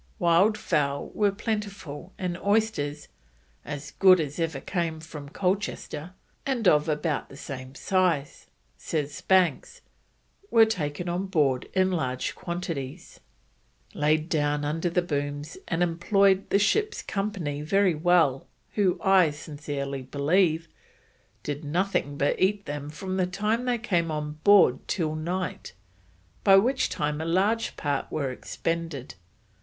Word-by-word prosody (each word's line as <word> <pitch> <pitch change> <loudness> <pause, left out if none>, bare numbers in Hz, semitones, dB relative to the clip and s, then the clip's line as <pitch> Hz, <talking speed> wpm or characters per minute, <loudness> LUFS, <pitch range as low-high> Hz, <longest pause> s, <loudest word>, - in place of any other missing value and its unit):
Wild 190 +4 +4
fowl 140 -4 -1
were 205 -1 +2
plentiful, 200 -6 -5
and 180 -2 -2
oysters, 200 -9 0 0.6
"as 145 0 -6
good 185 -2 +6
as 150 0 -3
ever 160 -4 -1
came 165 0 -2
from 150 -3 -9
Colchester," 180 -2 -2 0.3
and 250 -7 0
of 150 -1 +4
about 150 -1 -1
the 135 - -12
same 130 -2 -8
size, 180 -6 0 0.3
says 145 -2 -3
Banks, 190 - +2 0.7
were 225 -1 +7
taken 175 -5 -3
on 180 +3 -2
board 145 -9 +1
in 190 0 +3
large 130 -7 -2
quantities: 170 -7 -5 0.7
"laid 155 +1 +1
down 145 -2 0
under 165 +4 -1
the 175 +1 +1
booms, 145 -1 -3
and 170 +1 +1
employed 190 +3 +2
the - - +4
ship's 425 - +1
company 195 -8 -3
very 195 +4 +3
well, 160 -4 +2 0.3
who, 195 -4 +1
I 190 -4 +5
sincerely 145 -2 -5
believe, 160 +5 +1 0.8
did 145 +1 -4
nothing 150 -2 -1
but 145 - 0
eat 200 +2 +2
them 145 0 -5
from 185 +5 -4
the 185 -1 +1
time 210 +6 -1
they 245 -1 +1
came 175 -8 0
on 150 0 -4
board 195 -11 +6
till 160 -5 -1
night, 175 - -4 0.7
by 195 - +7
which 250 +7 +3
time 150 +1 -2
a - - -3
large 200 +7 +1
part 145 -2 -2
were 140 -4 -1
expended. 165 0 -4
165 Hz, 135 wpm, -26 LUFS, 145-195 Hz, 0.8 s, were